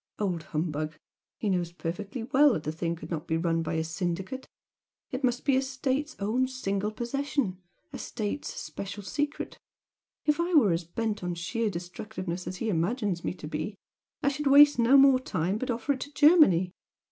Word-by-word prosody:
Old 185 Hz, -5 st, -1 dB
humbug! 155 Hz, -1 st, -2 dB, 0.4 s
He 215 Hz, -, -3 dB
knows 175 Hz, -2 st, 0 dB
perfectly 195 Hz, +7 st, -5 dB
well 275 Hz, +3 st, +5 dB
that 155 Hz, -, -2 dB
the 155 Hz, -, -2 dB
thing 165 Hz, +1 st, -2 dB
could 160 Hz, 0 st, -10 dB
not 155 Hz, -3 st, -3 dB
be 160 Hz, -, +1 dB
run 165 Hz, 0 st, +1 dB
by 165 Hz, -, -2 dB
a 160 Hz, -, +1 dB
syndicate! 180 Hz, +9 st, -3 dB, 0.6 s
It 255 Hz, +2 st, -4 dB
must 245 Hz, -1 st, +1 dB
be 275 Hz, -2 st, +4 dB
a 265 Hz, -, +3 dB
State's 270 Hz, +2 st, -2 dB
own 230 Hz, +6 st, +1 dB
single 210 Hz, -6 st, -2 dB
possession 240 Hz, -3 st, -2 dB, 0.3 s
a -, -, -5 dB
State's 220 Hz, +5 st, -3 dB
special 200 Hz, +1 st, -6 dB
secret. 290 Hz, +8 st, -3 dB, 0.7 s
If 300 Hz, +1 st, +2 dB
I 345 Hz, +1 st, +1 dB
were 220 Hz, -, +6 dB
as 165 Hz, +1 st, -1 dB
bent 215 Hz, +3 st, -3 dB
on 175 Hz, -1 st, -2 dB
sheer 220 Hz, +6 st, -1 dB
destructiveness 180 Hz, 0 st, -5 dB
as 180 Hz, -, -4 dB
he 225 Hz, +2 st, -2 dB
imagines 190 Hz, +1 st, 0 dB
me -, -, -2 dB
to 150 Hz, -, -8 dB
be, 155 Hz, +7 st, -4 dB, 0.5 s
I 280 Hz, -, +4 dB
should 285 Hz, +1 st, -2 dB
waste 285 Hz, -1 st, +8 dB
no 240 Hz, +4 st, +6 dB
more 270 Hz, -1 st, +7 dB
time, 190 Hz, -4 st, -1 dB
but 260 Hz, -, -3 dB
offer 245 Hz, +4 st, 0 dB
it 265 Hz, -, -7 dB
to 285 Hz, -, -6 dB
Germany. 290 Hz, -, +6 dB
210 Hz, 185 wpm, -28 LUFS, 175-260 Hz, 0.7 s, waste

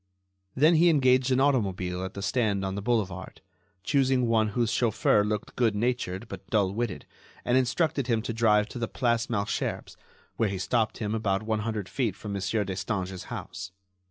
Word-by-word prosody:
Then 155 Hz, +6 st, +5 dB
he 170 Hz, +2 st, +6 dB
engaged 130 Hz, -4 st, +4 dB
an 130 Hz, 0 st, +3 dB
automobile 95 Hz, -10 st, +1 dB
at 95 Hz, -, -6 dB
the 100 Hz, -, -5 dB
stand 105 Hz, -4 st, 0 dB
on 95 Hz, -, -2 dB
the 100 Hz, -, -4 dB
boulevard, 100 Hz, -5 st, -2 dB, 0.4 s
choosing 130 Hz, -1 st, +2 dB
one 115 Hz, -2 st, +2 dB
whose 110 Hz, +1 st, 0 dB
chauffeur 110 Hz, -3 st, +2 dB
looked 105 Hz, 0 st, -3 dB
good 115 Hz, -4 st, +2 dB
natured 115 Hz, -3 st, -1 dB
but 95 Hz, -2 st, -9 dB
dull 100 Hz, -3 st, +2 dB
witted, 115 Hz, -2 st, -3 dB, 0.4 s
and 120 Hz, -, +2 dB
instructed 130 Hz, +1 st, +1 dB
him 115 Hz, -3 st, +1 dB
to 115 Hz, -, -3 dB
drive 105 Hz, -2 st, +3 dB
to 125 Hz, -, -7 dB
the 115 Hz, -, -1 dB
Place 120 Hz, -2 st, 0 dB
Malesherbes, 100 Hz, -2 st, -2 dB, 0.4 s
where 110 Hz, -, +2 dB
he 95 Hz, -, -3 dB
stopped 110 Hz, +4 st, 0 dB
him 105 Hz, -1 st, -2 dB
about 110 Hz, -2 st, 0 dB
one 110 Hz, 0 st, -1 dB
hundred 105 Hz, -2 st, -3 dB
feet 115 Hz, -7 st, -1 dB
from 105 Hz, -1 st, -6 dB
Monsieur 100 Hz, +2 st, 0 dB
Destange's 95 Hz, -1 st, -3 dB
house. 90 Hz, 0 st, -7 dB
110 Hz, 180 wpm, -27 LUFS, 100-120 Hz, 0.4 s, he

